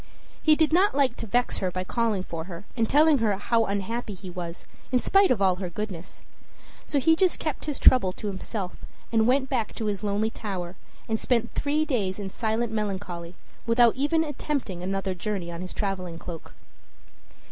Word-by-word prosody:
He 310 Hz, -1 st, +5 dB
did 315 Hz, 0 st, +2 dB
not 375 Hz, -1 st, +4 dB
like 275 Hz, -4 st, +3 dB
to -, -, -6 dB
vex 245 Hz, +4 st, +1 dB
her 185 Hz, -, 0 dB
by 185 Hz, +1 st, -3 dB
calling 220 Hz, -1 st, 0 dB
for 165 Hz, -3 st, -6 dB
her 175 Hz, +1 st, -8 dB
and 225 Hz, -3 st, +1 dB
telling 300 Hz, 0 st, +5 dB
her 215 Hz, -3 st, +2 dB
how 230 Hz, +3 st, +2 dB
unhappy 205 Hz, +2 st, -3 dB
he 185 Hz, 0 st, -9 dB
was, 175 Hz, -1 st, -6 dB, 0.3 s
in 255 Hz, -, +4 dB
spite 390 Hz, +9 st, +4 dB
of 210 Hz, -6 st, +2 dB
all 185 Hz, -2 st, +3 dB
her 185 Hz, -1 st, -4 dB
goodness; 185 Hz, -1 st, -6 dB, 0.6 s
so 290 Hz, -, 0 dB
he 320 Hz, +4 st, +4 dB
just 365 Hz, +1 st, +2 dB
kept 310 Hz, -3 st, -3 dB
his 295 Hz, -2 st, -2 dB
trouble 245 Hz, -8 st, +6 dB
to -, -, -9 dB
himself, 195 Hz, -1 st, -4 dB, 0.3 s
went 250 Hz, +4 st, +3 dB
back 245 Hz, -5 st, -1 dB
to 225 Hz, -, -3 dB
his 205 Hz, -2 st, -1 dB
lonely 210 Hz, +2 st, 0 dB
tower, 185 Hz, -5 st, -5 dB, 0.3 s
and 220 Hz, 0 st, 0 dB
spent 235 Hz, -2 st, +1 dB
three 300 Hz, +2 st, +1 dB
days 205 Hz, -10 st, -1 dB
in 200 Hz, -2 st, -5 dB
silent 225 Hz, +1 st, -1 dB
melancholy, 185 Hz, -5 st, -3 dB, 0.3 s
without 230 Hz, 0 st, +5 dB
even 295 Hz, +4 st, +2 dB
attempting 280 Hz, -, -3 dB
another 195 Hz, +1 st, -2 dB
journey 180 Hz, -1 st, -3 dB
on 170 Hz, 0 st, -6 dB
his 185 Hz, -, -6 dB
traveling 185 Hz, -4 st, -3 dB
cloak. 165 Hz, -1 st, -9 dB
215 Hz, 185 wpm, -26 LUFS, 185-255 Hz, 0.6 s, trouble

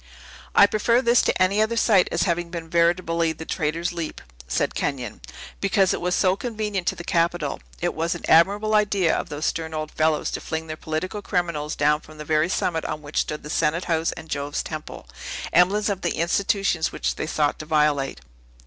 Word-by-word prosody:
"I 200 Hz, -, +9 dB
prefer 230 Hz, +4 st, +2 dB
this 235 Hz, 0 st, +5 dB
to -, -, 0 dB
any 195 Hz, +3 st, +3 dB
other 225 Hz, +2 st, +1 dB
site 200 Hz, -6 st, +4 dB
as 170 Hz, -, +1 dB
having 175 Hz, -2 st, -1 dB
been 165 Hz, -2 st, -7 dB
veritably 170 Hz, -1 st, +2 dB
the 160 Hz, -, -9 dB
Traitor's 165 Hz, +2 st, -2 dB
Leap," 170 Hz, -2 st, -5 dB, 0.3 s
said 65 Hz, -, 0 dB
Kenyon, 125 Hz, -6 st, -3 dB, 0.4 s
"because 195 Hz, -1 st, +2 dB
it -, -, -3 dB
was 180 Hz, 0 st, 0 dB
so 185 Hz, -1 st, +3 dB
convenient 210 Hz, -4 st, -3 dB
to -, -, +1 dB
the 175 Hz, -, -8 dB
Capitol. 170 Hz, -3 st, 0 dB, 0.2 s
It -, -, 0 dB
was 165 Hz, +2 st, -1 dB
an 175 Hz, -, -9 dB
admirable 205 Hz, +6 st, +4 dB
idea 200 Hz, -5 st, +3 dB
of -, -, -3 dB
those 145 Hz, +1 st, -4 dB
stern 160 Hz, -1 st, -2 dB
old 155 Hz, 0 st, -4 dB
fellows 155 Hz, -1 st, +1 dB
to -, -, -4 dB
fling 160 Hz, 0 st, -4 dB
their 155 Hz, -1 st, -5 dB
political 160 Hz, +7 st, -4 dB
criminals 170 Hz, -6 st, -2 dB
down 150 Hz, +1 st, +2 dB
from 155 Hz, -2 st, -15 dB
the 150 Hz, -, -7 dB
very 155 Hz, +2 st, +2 dB
summit 165 Hz, -3 st, 0 dB
on 150 Hz, -, -4 dB
which 145 Hz, +1 st, -2 dB
stood 150 Hz, -, -5 dB
the 150 Hz, -, -8 dB
Senate 160 Hz, +4 st, +1 dB
House 165 Hz, -1 st, +1 dB
and 160 Hz, -, -10 dB
Jove's 145 Hz, -1 st, -3 dB
Temple, -, -, -7 dB, 0.5 s
emblems 195 Hz, +5 st, +4 dB
of 200 Hz, -3 st, -2 dB
the 175 Hz, -, -1 dB
institutions 190 Hz, 0 st, +1 dB
which -, -, -1 dB
they -, -, -4 dB
sought 150 Hz, -2 st, 0 dB
to 155 Hz, -, -7 dB
violate. 150 Hz, -, +1 dB
170 Hz, 200 wpm, -24 LUFS, 155-190 Hz, 0.5 s, I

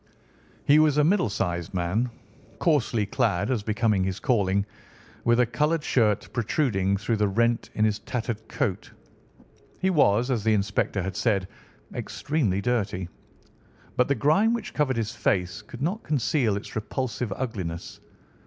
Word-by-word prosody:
He 145 Hz, +2 st, +6 dB
was 155 Hz, -2 st, +4 dB
a 150 Hz, -, +5 dB
middle 180 Hz, -, +3 dB
sized 85 Hz, -3 st, -2 dB
man, 95 Hz, +8 st, 0 dB, 0.5 s
coarsely 125 Hz, -, +2 dB
clad 110 Hz, -1 st, 0 dB
as 120 Hz, -5 st, 0 dB
became 105 Hz, -2 st, +1 dB
his 95 Hz, -1 st, -2 dB
calling, 100 Hz, -6 st, +1 dB, 0.6 s
with 120 Hz, +1 st, +4 dB
a 125 Hz, -, +5 dB
coloured 150 Hz, +7 st, 0 dB
shirt 110 Hz, -8 st, +2 dB
protruding 105 Hz, -5 st, +1 dB
through 105 Hz, +3 st, -1 dB
the 105 Hz, 0 st, +2 dB
rent 115 Hz, +4 st, +1 dB
in 110 Hz, -, +3 dB
his 105 Hz, -1 st, +1 dB
tattered 110 Hz, -1 st, -4 dB
coat. 110 Hz, -11 st, -2 dB, 0.9 s
He 190 Hz, -, +1 dB
was, 125 Hz, -, +3 dB
as 115 Hz, -5 st, 0 dB
the 110 Hz, -1 st, +3 dB
inspector 100 Hz, -1 st, 0 dB
had 95 Hz, +1 st, -4 dB
said, 100 Hz, -6 st, +1 dB, 0.5 s
extremely 130 Hz, -11 st, -1 dB
dirty, 100 Hz, -6 st, -1 dB, 0.9 s
but 125 Hz, -, +3 dB
the 140 Hz, -, +2 dB
grime 190 Hz, -, +3 dB
which 215 Hz, -2 st, -6 dB
covered 135 Hz, -5 st, +1 dB
his 110 Hz, -1 st, -1 dB
face 90 Hz, +2 st, 0 dB
could 120 Hz, +5 st, -8 dB
not 190 Hz, +8 st, -1 dB
conceal 135 Hz, -6 st, +1 dB
its 100 Hz, -, -8 dB
repulsive 115 Hz, +1 st, -3 dB
ugliness. 95 Hz, -10 st, -5 dB
115 Hz, 150 wpm, -26 LUFS, 100-135 Hz, 0.9 s, He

